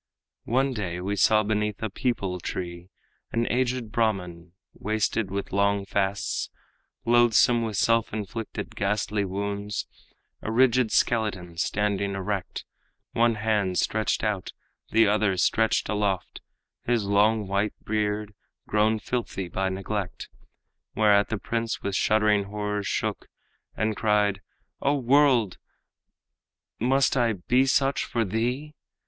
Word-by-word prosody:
One 130 +3 +2
day 90 -6 -3
we 100 +3 -2
saw 110 +2 +4
beneath 105 0 -1
a 110 - -1
peepul 100 -6 -2
tree 85 0 -5 0.4
An 115 0 0
aged 125 -2 -1
Brahman, 90 -7 -2 0.2
wasted 110 0 -1
with 100 0 -4
long 100 0 +2
fasts, 100 0 -1 0.6
Loathsome 120 0 +4
with 110 -3 -3
self 115 +1 +2
inflicted 110 +1 -5
ghastly 105 +1 0
wounds, 100 +2 -3 0.6
A 110 - -4
rigid 125 -1 +3
skeleton, 105 -7 0
standing 100 +1 0
erect, 95 -1 -4 0.5
One 115 0 +2
hand 105 -4 0
stretched 110 -1 0
out, 105 -4 -2 0.4
the 115 +1 +5
other 105 -2 +2
stretched 110 +4 +2
aloft, 100 -3 -2 0.4
His 120 -3 +1
long 105 +1 +2
white 100 +2 0
beard 105 0 -1 0.3
grown 110 +1 +2
filthy 105 -5 -3
by 95 +1 -1
neglect. 95 0 -4 0.7
Whereat 105 -2 +4
the 110 - -1
prince 115 +2 -3
with 100 -1 -2
shuddering 105 -1 +3
horror 105 0 -3
shook, 100 - -2 0.5
And 110 0 0
cried, 105 -2 +1 0.4
'O 140 +1 +2
world! 130 -6 +3 1.2
must 135 +4 +2
I 120 -3 +2
be 125 +8 +2
such 135 +1 +2
for 115 -2 -1
thee?' 125 +9 -2
105 Hz, 120 wpm, -26 LUFS, 100-115 Hz, 1.2 s, the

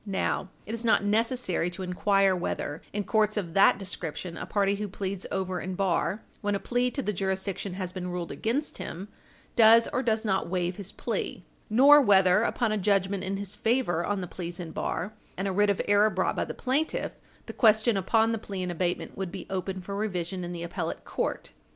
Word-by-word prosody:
Now 195 -2 -1 0.2
it 215 - -5
is 230 0 -4
not 225 -3 +3
necessary 220 -4 +1
to 185 +2 -7
inquire 195 +1 +2
whether, 165 -3 -3
in 205 0 -2
courts 215 0 +2
of 175 -5 -3
that 195 0 +6
description, 180 -3 -5
a - - -6
party 200 -1 +2
who 210 0 -3
pleads 195 -1 -4
over 185 -2 -2
in 185 0 -4
bar 185 +1 0 0.2
when 205 -1 0
a - - -1
plea 245 +3 0
to 275 +2 -3
the 210 - -1
jurisdiction 190 0 -2
has 185 -2 -3
been 180 -1 -5
ruled 175 -1 -4
against 265 +7 -2
him 190 +4 -6 0.5
does 230 0 +7
or 255 - +1
does 225 -2 0
not 190 -4 0
waive 180 0 -1
his 200 -1 -7
plea, - - -4 0.2
nor 280 +7 +8
whether, 195 -4 +5
upon 230 -1 0
a 215 - 0
judgment 195 -1 +1
in 195 +1 -2
his 200 0 -4
favor 225 -8 +1
on 200 0 -1
the 180 - -4
pleas 175 +1 -6
in 170 -2 -6
bar 195 +5 -3 0.2
and 190 +2 -1
a - - 0
writ 205 +2 +3
of 200 - +1
error 205 +1 +5
brought 190 -2 0
by - - 0
the - - -6
plaintiff, 280 +5 -1 0.3
the - - -7
question 220 0 +4
upon 220 +4 +2
the 225 - -1
plea 195 -3 -5
in 180 - -2
abatement 175 +1 -2
would 190 -2 -4
be - - -7
open 190 0 -3
for 200 +2 -6
revision 185 -3 -2
in 175 - -5
the 170 -1 -5
appellate 170 - -4
court. - - -3
195 Hz, 210 wpm, -28 LUFS, 185-215 Hz, 0.5 s, nor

